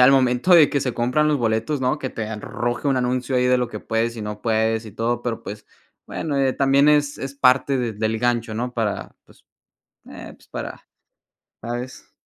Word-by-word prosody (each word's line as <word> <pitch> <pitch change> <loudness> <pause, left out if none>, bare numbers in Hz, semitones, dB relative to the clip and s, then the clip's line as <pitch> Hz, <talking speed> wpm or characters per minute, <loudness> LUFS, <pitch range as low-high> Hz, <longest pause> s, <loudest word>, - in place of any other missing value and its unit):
al 125 +2 +8
momento 130 +5 +4
de 160 -4 +7
que 140 - 0
se 125 -3 -2
compran 125 +6 +1
los 150 - +2
boletos, 115 +4 0
¿no? 130 +4 0
Que 135 - -3
te 110 - -4
arroje 120 +4 -3
un 135 - +2
anuncio 125 +1 0
ahí 125 - +2
de 125 0 +4
lo 125 -1 -1
que - - -6
puedes 115 +1 -1
y 110 - -5
no 105 0 -6
puedes 110 0 +1
y 105 - -10
todo, 120 +3 -1
pero 115 -2 -3
pues 105 +1 -8 0.4
bueno, 150 -3 -3
eh, 135 -1 +2
también 140 +1 +4
es 145 -1 +2
es 135 +1 -5
parte 135 0 +3
de 120 -3 -1
del 110 +1 -1
gancho, 120 -2 0
¿no? 120 +3 -3
Para 110 -4 -3
pues, - - -23 0.6
eh, - - -10
pues, - - -23
para - - -7 0.8
¿Sabes? 120 +2 -6
125 Hz, 205 wpm, -22 LUFS, 115-135 Hz, 0.8 s, al